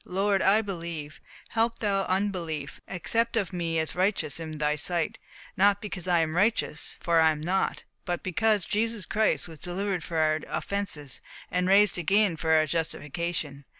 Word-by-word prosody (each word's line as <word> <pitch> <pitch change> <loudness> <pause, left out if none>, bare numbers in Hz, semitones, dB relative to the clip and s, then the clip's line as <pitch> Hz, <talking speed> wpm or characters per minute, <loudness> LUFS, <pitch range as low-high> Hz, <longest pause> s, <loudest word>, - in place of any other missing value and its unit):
Lord, 195 +1 +1
I 210 +3 +4
believe; 170 -6 -6 0.3
help 230 +1 +1
thou 195 -3 0
my 185 - +2
unbelief. 170 -7 -3
Accept 230 +5 0
of 195 -5 -1
me 165 -2 -1
as 160 -1 0
righteous 185 -4 0
in 165 -1 -5
thy 150 0 +1
sight, 165 +2 +1 0.4
not 200 +1 +4
because 200 -4 -5
I 175 -2 +4
am 160 0 -1
righteous 200 -5 0
for 170 -1 +2
I 160 - +6
am 155 -1 -1
not, 180 +5 -1 0.2
but 175 -2 -3
because 210 +2 +1
Jesus 225 -1 -1
Christ 220 -3 +1
was 160 -3 -11
delivered 185 +1 -1
for 165 - -4
our 155 0 +2
offences, 170 -9 -3 0.3
and 180 0 +1
raised 200 -1 +5
again 195 +1 +3
for 160 0 -3
our 155 -1 +5
justification. 160 -1 -3
180 Hz, 170 wpm, -27 LUFS, 160-200 Hz, 0.4 s, I